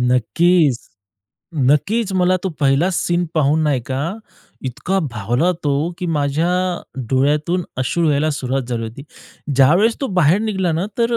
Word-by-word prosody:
नक्कीच, 135 +4 +2 0.9
नक्कीच. 200 +7 +1
मला 185 0 +2
तो 190 - +1
पहिला 140 +6 +3
सीन 175 0 0
पाहून 155 +1 +2
नाही 145 -5 +1
का 140 +7 -2 0.5
इतका 175 +9 -2
भावला 120 - 0
तो, 145 +4 0
की 180 - -3
माझ्या 150 +1 0 0.6
डोळ्यातून 150 +7 +1
अश्रू 150 +5 0
यायला 150 +2 +1
सुरुवात 135 -1 -2
झाली 120 -2 -2
होती. 115 +6 -8 0.5
ज्यावेळेस 170 - +4
तो 275 - 0
बाहेर 165 +4 +4
निघाला 190 -6 -1
ना 170 +5 -1
तर 235 0 +2
155 Hz, 140 wpm, -19 LUFS, 135-180 Hz, 0.9 s, ज्यावेळेस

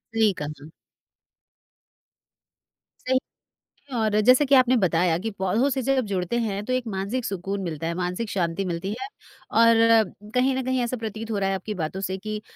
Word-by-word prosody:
सही 220 -2 +4
कहा। 145 - -2 2.6
सही 260 0 +3 0.8
और 215 -1 +2
जैसे 255 +3 +6
कि 275 0 +5
आपने 255 0 +5
बताया 175 -4 +2
कि 225 +4 -3
पौधों 210 +9 +2
से 265 -1 -1
जब 265 -2 +1
जुड़ते 190 +3 -1
हैं 205 -3 -2
तो 255 - -1
एक 255 -1 0
मानसिक 200 +5 -3
सुकून 195 +1 -3
मिलता 165 -2 -4
है, 170 - -1
मानसिक 180 +5 -3
शांति 180 0 -1
मिलती 175 +1 -3
है 395 - -4 0.5
और 230 0 +6 0.6
कहीं 260 +1 +3
न 265 - -1
कहीं 260 0 0
ऐसा 240 +1 -2
प्रतीत 225 0 -5
हो 205 - -1
रहा 195 -1 0
है 195 - 0
आपकी 210 +3 -5
बातों 170 +5 -3
से 190 0 -2
कि 215 +2 -5
210 Hz, 175 wpm, -24 LUFS, 190-250 Hz, 2.6 s, जैसे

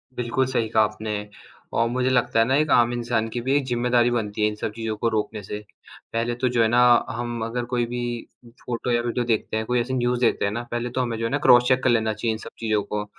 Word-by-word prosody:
बिल्कुल 125 +2 0
सही 125 -3 -1
कहा 110 0 +4
आपने, 105 -1 -4 0.4
और 115 - +2
मुझे 125 +1 0
लगता 125 -3 +2
है - - +6
ना 130 +3 +2
एक 155 -1 +1
आम 120 0 +4
इंसान 120 -2 -1
की 120 - -2
भी 130 +3 +1
एक 140 - -1
ज़िम्मेदारी 120 -1 +2
बनती 110 -3 -2
है 105 - +4
इन 105 - -3
सब 105 - -4
चीज़ों 115 -1 -3
को 115 - 0
रोकने 110 0 -2
से। 105 +2 -5 0.5
पहले 115 +1 0
तो 130 +2 0
जो 115 - +4
है 110 - +4
ना, 120 +2 +3 0.3
हम 120 -1 -4
अगर 120 +1 -3
कोई 120 -1 +1
भी 120 +1 -4 0.6
फ़ोटो 120 0 -3
या 120 0 +2
वीडियो 120 +1 -2
देखते 110 -1 -1
हैं, 110 - -2
कोई 125 +2 +1
ऐसी 120 +2 -2
न्यूज़ 125 -1 0
देखते 115 -4 +2
हैं 100 - 0
ना, 120 +3 -3
पहले 120 +1 -2
तो 130 +2 -2
हमें 120 -2 -2
जो 115 - -2
है 115 - -2
ना 145 - +2
क्रॉस 120 0 +7
चेक 130 -1 +2
कर - - +3
लेना 110 -2 +2
चाहिए 110 +2 -1
इन - - -4
सब - - -9
चीज़ों 110 -2 0
को। 105 +1 -4
120 Hz, 270 wpm, -24 LUFS, 110-125 Hz, 0.6 s, क्रॉस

